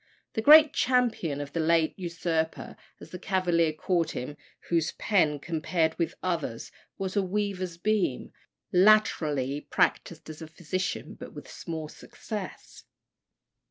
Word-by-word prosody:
The 220 - -1
great 305 +4 +8
champion 240 - +1
of 145 0 -8
the 165 - -2
late 160 0 +2
usurper, 170 -3 -3 0.2
as - - -13
the 180 - -7
Cavaliers 175 -5 +1
called 170 -1 0
him, 145 +1 -5 0.3
"whose 165 -2 +1
pen, 160 -8 +1
compared 160 +1 -1
with 170 - -1
others', 165 -10 -3 0.3
was 190 -1 -3
as 205 - -5
a - - +4
weaver's 190 -2 -3
beam," 200 -8 -1 0.4
latterly 155 -9 +3
practised 165 -2 0
as 155 0 -9
a 160 - -7
physician, 175 +4 -4
but - - -11
with - - -10
small 160 -2 -6
success. 205 +5 -8
170 Hz, 135 wpm, -27 LUFS, 160-190 Hz, 0.4 s, great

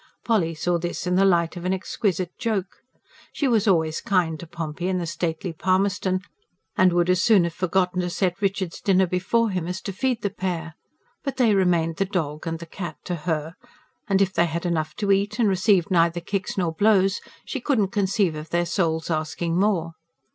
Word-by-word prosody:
Polly 180 -8 +1
saw 175 +2 0
this 175 +1 -4
in 180 - 0
the 190 +2 +4
light 170 -3 +2
of 175 - -7
an 185 +1 0
exquisite 185 -2 -2
joke. 200 -5 -2 0.5
She 285 - 0
was 225 -3 +2
always 160 -4 +2
kind 170 -5 +1
to 170 - -9
Pompey 165 +1 -4
and 185 -1 0
the 175 - -2
stately 165 +2 -3
Palmerston, 185 +1 +1 0.5
and 185 -1 +5
would 175 0 +2
as 180 -1 +3
soon 215 -6 +5
have 170 -1 -2
forgotten 180 0 0
to 180 - -2
set 180 0 -1
Richard's 190 -3 -1
dinner 190 -1 +3
before 190 +6 +1
him 180 -3 -2
as 180 +1 -3
to 195 - -5
feed 250 +3 -1
the 200 - 0
pair; 180 -6 -3 0.5
but 275 -2 -4
they 235 -5 +4
remained 175 -4 +2
"the 195 - +1
dog" 160 -5 -3
and 165 0 -2
"the 170 - -9
cat" 175 +1 -7
to 180 - -4
her, 160 -1 -2 0.5
and, 195 -2 +4
if 190 -1 -2
they 170 - +3
had 170 +2 -4
enough 155 -3 -1
to 205 -2 0
eat, 200 +2 +1
and 235 -3 +3
received 190 -2 +2
neither 170 -1 +3
kicks 195 +4 -3
nor 175 -4 0
blows, 195 +1 +3 0.2
she 270 - -4
could 275 +1 +1
not 195 -3 +1
conceive 195 -3 +1
of 155 +1 -7
their 175 +1 +1
souls 170 -2 -1
asking 165 +2 -1
more. 185 -5 +1
180 Hz, 205 wpm, -24 LUFS, 170-195 Hz, 0.5 s, and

